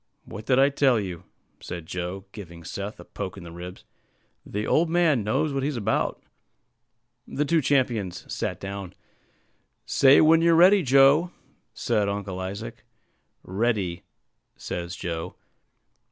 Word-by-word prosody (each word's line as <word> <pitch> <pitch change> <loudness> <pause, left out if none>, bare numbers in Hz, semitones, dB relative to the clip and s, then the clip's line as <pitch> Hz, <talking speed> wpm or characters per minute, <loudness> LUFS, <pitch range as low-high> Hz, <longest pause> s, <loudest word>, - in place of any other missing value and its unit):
"What 110 +2 -9
did 130 - +3
I 135 +1 +5
tell 135 -4 +3
you?" 90 -5 -6 0.3
said 85 -2 -7
Joe, 90 +3 -5
giving 85 -6 -10
Seth 100 +4 -6
a 90 - -11
poke 95 -1 -6
in 95 - -9
the 85 - -10
ribs; 90 +2 -9 0.6
"the 105 +1 -4
old 165 +1 +2
man 165 -8 +2
knows 140 +8 0
what 135 - -1
he's 140 -1 -2
about." 110 -1 -1 1.0
The 150 - -1
two 165 +2 +2
champions 120 -10 0
sat - - -3
down. 100 -2 -7 0.9
"Say 135 +1 +5
when 160 +1 +5
you're 170 0 +4
ready, 185 +4 +6
Joe," 140 +4 +5 0.5
said 105 -1 0
Uncle 100 -2 -4
Isaac. 95 -8 -6 0.6
"Ready," 95 -4 -1 0.6
says 85 +1 -5
Joe. 85 -2 -5
105 Hz, 140 wpm, -25 LUFS, 90-140 Hz, 1.0 s, ready